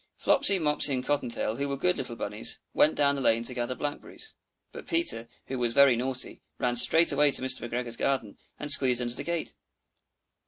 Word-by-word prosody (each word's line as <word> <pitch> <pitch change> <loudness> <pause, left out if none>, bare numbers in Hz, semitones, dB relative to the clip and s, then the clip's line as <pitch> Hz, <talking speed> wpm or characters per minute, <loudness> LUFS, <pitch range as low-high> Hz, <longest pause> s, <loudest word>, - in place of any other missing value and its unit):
Flopsy, 265 -8 +2
Mopsy, 150 -4 +1
and 125 0 -5
Cotton 145 -4 -2
tail, 115 -1 -3
who 140 +1 -3
were 140 - -4
good 180 +6 0
little 125 -3 -6
bunnies, 105 -1 -4
went 155 - +2
down 140 -1 +1
the 140 - -5
lane 115 -2 0
to 125 - +4
gather 120 0 -5
blackberries; 145 - -8 0.4
but - - -12
Peter, 335 - +2 0.2
who 130 -1 -6
was 120 -1 -2
very 140 -2 +4
naughty, 130 +2 -4 0.2
ran 120 -1 -2
straight 160 +7 +8
away 145 +1 +2
to 135 - 0
Mr. 130 - 0
McGregor's 120 -1 -5
garden, 130 -7 -3 0.2
and 145 0 -1
squeezed 125 -3 +2
under 120 0 -4
the - - -6
gate. 170 -1 -5
130 Hz, 200 wpm, -26 LUFS, 120-145 Hz, 0.4 s, straight